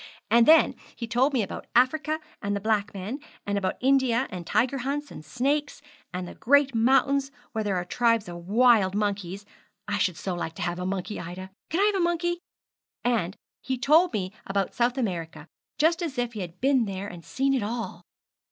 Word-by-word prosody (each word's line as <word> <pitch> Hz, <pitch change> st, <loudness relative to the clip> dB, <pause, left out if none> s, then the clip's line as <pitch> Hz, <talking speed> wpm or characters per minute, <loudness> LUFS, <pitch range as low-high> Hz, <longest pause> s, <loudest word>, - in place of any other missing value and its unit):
And 235 Hz, 0 st, +6 dB
then 320 Hz, +1 st, +7 dB, 0.2 s
he 235 Hz, -, -4 dB
told 245 Hz, +5 st, +2 dB
me 250 Hz, -5 st, +1 dB
about 195 Hz, -, -7 dB
Africa 305 Hz, +5 st, +3 dB, 0.2 s
and 200 Hz, 0 st, -1 dB
the -, -, -1 dB
black 210 Hz, 0 st, 0 dB
men, 205 Hz, +8 st, -5 dB, 0.3 s
and 205 Hz, -, -1 dB
about 195 Hz, -2 st, -1 dB
India, 260 Hz, -2 st, +3 dB
and 175 Hz, -2 st, -6 dB
tiger 250 Hz, +5 st, +1 dB
hunts, 285 Hz, +3 st, -3 dB
and -, -, -9 dB
snakes, 280 Hz, -, -1 dB, 0.3 s
and 180 Hz, 0 st, -4 dB
the -, -, -8 dB
great 285 Hz, +1 st, +3 dB
mountains 270 Hz, +4 st, +3 dB, 0.2 s
where 220 Hz, -, -2 dB
there 205 Hz, -2 st, 0 dB
are 175 Hz, -1 st, -1 dB
tribes 230 Hz, +2 st, +2 dB
of 175 Hz, 0 st, -8 dB
wild 220 Hz, -4 st, +5 dB
monkeys; 200 Hz, -2 st, -2 dB, 0.4 s
I 205 Hz, 0 st, -1 dB
should 180 Hz, -5 st, +1 dB
so 180 Hz, +4 st, -3 dB
like 165 Hz, -2 st, -4 dB
to -, -, -4 dB
have 175 Hz, 0 st, -2 dB
a 180 Hz, -, -2 dB
monkey, 195 Hz, +2 st, -3 dB
Ida! 185 Hz, +2 st, -7 dB, 0.2 s
Can 335 Hz, +5 st, +1 dB
I -, -, +5 dB
have 420 Hz, -1 st, +2 dB
a -, -, +3 dB
monkey? 345 Hz, 0 st, 0 dB, 0.6 s
And 220 Hz, -6 st, 0 dB, 0.3 s
he 260 Hz, -1 st, -2 dB
told 310 Hz, +8 st, +4 dB
me 185 Hz, -1 st, -3 dB
about 195 Hz, -1 st, -1 dB
South 245 Hz, +2 st, +1 dB
America, 165 Hz, -, -3 dB, 0.3 s
just 330 Hz, +3 st, +3 dB
as 310 Hz, -6 st, -3 dB
if 245 Hz, -1 st, -1 dB
he 215 Hz, -, -6 dB
had 175 Hz, -1 st, -7 dB
been 265 Hz, -2 st, +3 dB
there 195 Hz, 0 st, -4 dB
and 175 Hz, -4 st, -9 dB
seen 270 Hz, +7 st, 0 dB
it 260 Hz, -, +1 dB
all.' 230 Hz, +3 st, -4 dB
230 Hz, 200 wpm, -26 LUFS, 190-270 Hz, 0.6 s, then